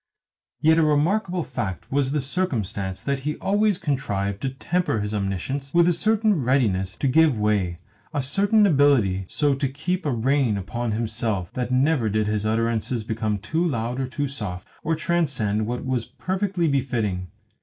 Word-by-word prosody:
Yet 160 Hz, +1 st, +5 dB
a -, -, +4 dB
remarkable 175 Hz, +5 st, +1 dB
fact 120 Hz, -, -5 dB
was 135 Hz, -1 st, +1 dB
the 150 Hz, 0 st, 0 dB
circumstance 110 Hz, -, -2 dB
that 140 Hz, -1 st, -1 dB
he 150 Hz, +3 st, -3 dB
always 205 Hz, -1 st, +1 dB
contrived 100 Hz, -, -2 dB
to 135 Hz, -, -1 dB
temper 175 Hz, 0 st, -1 dB
his 105 Hz, +1 st, -3 dB
omniscience 105 Hz, -, -3 dB
with 170 Hz, 0 st, +6 dB
a 175 Hz, -, +4 dB
certain 215 Hz, -1 st, +2 dB
readiness 105 Hz, -8 st, +1 dB
to 140 Hz, -, 0 dB
give 150 Hz, -1 st, +4 dB
way, 105 Hz, -5 st, +1 dB, 0.3 s
a 145 Hz, -4 st, -1 dB
certain 205 Hz, +9 st, +3 dB
ability 135 Hz, -, +3 dB
so 145 Hz, -2 st, +2 dB
to 135 Hz, +1 st, -1 dB
keep 180 Hz, +7 st, -2 dB
a -, -, +1 dB
rein 125 Hz, -1 st, +1 dB
upon 115 Hz, +4 st, -3 dB
himself 110 Hz, -4 st, -2 dB
that 125 Hz, -1 st, -2 dB
never 130 Hz, -2 st, +2 dB
did 110 Hz, +1 st, +1 dB
his 105 Hz, 0 st, -1 dB
utterances 115 Hz, +1 st, 0 dB
become 110 Hz, -1 st, -1 dB
too 160 Hz, -, -1 dB
loud 125 Hz, -6 st, -1 dB
or 130 Hz, -, -1 dB
too 145 Hz, +2 st, -2 dB
soft, 105 Hz, -9 st, -6 dB, 0.2 s
or 165 Hz, +1 st, +1 dB
transcend 140 Hz, -11 st, 0 dB
what 120 Hz, +2 st, -3 dB
was 130 Hz, -3 st, 0 dB
perfectly 185 Hz, -2 st, -1 dB
befitting. 115 Hz, -10 st, -1 dB
130 Hz, 165 wpm, -24 LUFS, 110-155 Hz, 0.3 s, with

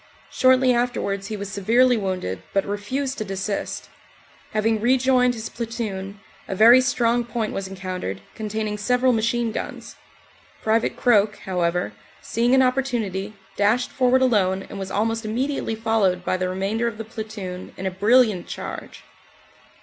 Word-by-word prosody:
Shortly 255 Hz, 0 st, +4 dB
afterwards 200 Hz, -5 st, -1 dB
he 215 Hz, -1 st, -4 dB
was 200 Hz, -1 st, -6 dB
severely 235 Hz, +6 st, +3 dB
wounded 185 Hz, -, -3 dB
but 195 Hz, -, +2 dB
refused 255 Hz, +7 st, -3 dB
to -, -, -1 dB
desist 195 Hz, 0 st, -4 dB, 0.6 s
Having 220 Hz, 0 st, +1 dB
rejoined 250 Hz, 0 st, +3 dB
his 220 Hz, -1 st, -5 dB
platoon, 210 Hz, -4 st, -5 dB, 0.3 s
a 195 Hz, -, -3 dB
very 235 Hz, +5 st, +8 dB
strong 240 Hz, -1 st, +1 dB
point 230 Hz, -2 st, -3 dB
was 195 Hz, -1 st, -3 dB
encountered, 185 Hz, -, -5 dB
containing 215 Hz, -1 st, -3 dB
several 250 Hz, +4 st, +2 dB
machine 230 Hz, +1 st, 0 dB
guns. -, -, -6 dB, 0.7 s
Pte. 225 Hz, +1 st, +2 dB
Croak. 210 Hz, -3 st, +3 dB
however, 180 Hz, -1 st, -1 dB, 0.3 s
seeing 240 Hz, +3 st, +1 dB
an 265 Hz, -, +5 dB
opportunity 235 Hz, -7 st, -1 dB, 0.2 s
dashed 215 Hz, +5 st, +2 dB
forward 260 Hz, 0 st, +3 dB
alone 195 Hz, -6 st, +2 dB
and 200 Hz, -, -6 dB
was 195 Hz, 0 st, -5 dB
almost 225 Hz, +3 st, -1 dB
immediately 240 Hz, +2 st, -2 dB
followed 215 Hz, -5 st, +1 dB
by -, -, +1 dB
the 185 Hz, 0 st, -1 dB
remainder 200 Hz, +5 st, -1 dB
of 225 Hz, -2 st, -4 dB
the 225 Hz, -, -6 dB
platoon 215 Hz, -5 st, -7 dB
in 190 Hz, -, -5 dB
a 190 Hz, -, 0 dB
brilliant 210 Hz, 0 st, +3 dB
charge. -, -, -7 dB
220 Hz, 145 wpm, -23 LUFS, 195-240 Hz, 0.7 s, very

